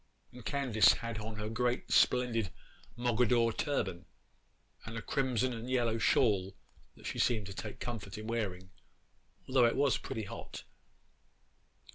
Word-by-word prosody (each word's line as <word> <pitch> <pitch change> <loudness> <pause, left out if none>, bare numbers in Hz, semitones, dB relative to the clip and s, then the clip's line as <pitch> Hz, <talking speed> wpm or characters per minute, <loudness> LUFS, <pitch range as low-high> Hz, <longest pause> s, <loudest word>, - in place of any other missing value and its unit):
And 125 -1 -12
Candace 125 -4 +4
had 115 -2 -5
on 110 0 -6
her 105 0 -4
great 120 +3 -1
splendid 120 -5 +3 0.5
Mogadore 120 -1 +2
turban, 95 - -2 0.8
and 115 +1 -6
a - - -3
crimson 130 -3 0
and 115 +2 -6
yellow 120 -3 +1
shawl 100 -6 +2 0.4
that - - -16
she - - -4
seemed 110 -4 +2
to 100 - -7
take 105 +2 -7
comfort 110 -4 -5
in 110 - -7
wearing, 95 -5 -3 0.8
although 130 -2 +4
it 115 - 0
was 140 -3 +2
pretty 110 - -4
hot. 100 - -8
115 Hz, 140 wpm, -33 LUFS, 105-125 Hz, 0.8 s, Candace